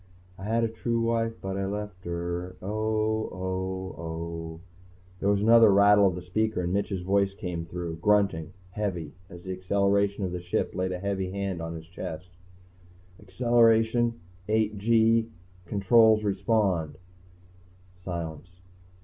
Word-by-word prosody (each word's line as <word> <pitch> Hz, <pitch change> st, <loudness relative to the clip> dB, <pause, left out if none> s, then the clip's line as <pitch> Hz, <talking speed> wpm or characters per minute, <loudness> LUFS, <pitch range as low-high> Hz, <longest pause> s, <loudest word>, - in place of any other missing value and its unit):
I 95 Hz, -, -7 dB
had 115 Hz, +2 st, +1 dB
a -, -, +3 dB
true 115 Hz, +1 st, -2 dB
wife 115 Hz, 0 st, 0 dB
but 95 Hz, 0 st, -3 dB
I 95 Hz, 0 st, -1 dB
left 105 Hz, -2 st, -6 dB
her... 85 Hz, +1 st, -4 dB
oh, 110 Hz, +2 st, -1 dB
oh, 95 Hz, 0 st, -4 dB
oh. 80 Hz, 0 st, -6 dB, 0.6 s
There 100 Hz, -, +1 dB
was 100 Hz, 0 st, +2 dB
another 115 Hz, 0 st, +7 dB
rattle 100 Hz, 0 st, +6 dB
of 90 Hz, -, -1 dB
the 90 Hz, -, -7 dB
speaker, 110 Hz, +2 st, -1 dB
and 90 Hz, +1 st, -1 dB
Mitch's 100 Hz, -2 st, -1 dB
voice 100 Hz, +1 st, +1 dB
came 85 Hz, -4 st, -5 dB
through, 85 Hz, -1 st, -5 dB
grunting, 95 Hz, -4 st, +1 dB, 0.2 s
heavy, 90 Hz, -7 st, -3 dB, 0.2 s
as 85 Hz, -2 st, -11 dB
the 95 Hz, -, -5 dB
acceleration 100 Hz, +2 st, +1 dB
of 90 Hz, -, -3 dB
the 90 Hz, -, -3 dB
Ship 85 Hz, 0 st, -2 dB
laid 90 Hz, 0 st, -1 dB
a 90 Hz, -, -2 dB
heavy 95 Hz, 0 st, -2 dB
hand 95 Hz, -2 st, -3 dB
on 80 Hz, 0 st, -5 dB
his 80 Hz, 0 st, -8 dB
chest. 85 Hz, 0 st, -7 dB, 0.9 s
"Acceleration... 115 Hz, +2 st, +2 dB, 0.3 s
eight 110 Hz, -1 st, +1 dB
gee... 115 Hz, +1 st, +3 dB, 0.4 s
controls 110 Hz, +3 st, +4 dB
respond." 95 Hz, -6 st, 0 dB, 1.1 s
Silence. 85 Hz, -2 st, -5 dB
100 Hz, 140 wpm, -27 LUFS, 90-110 Hz, 1.1 s, another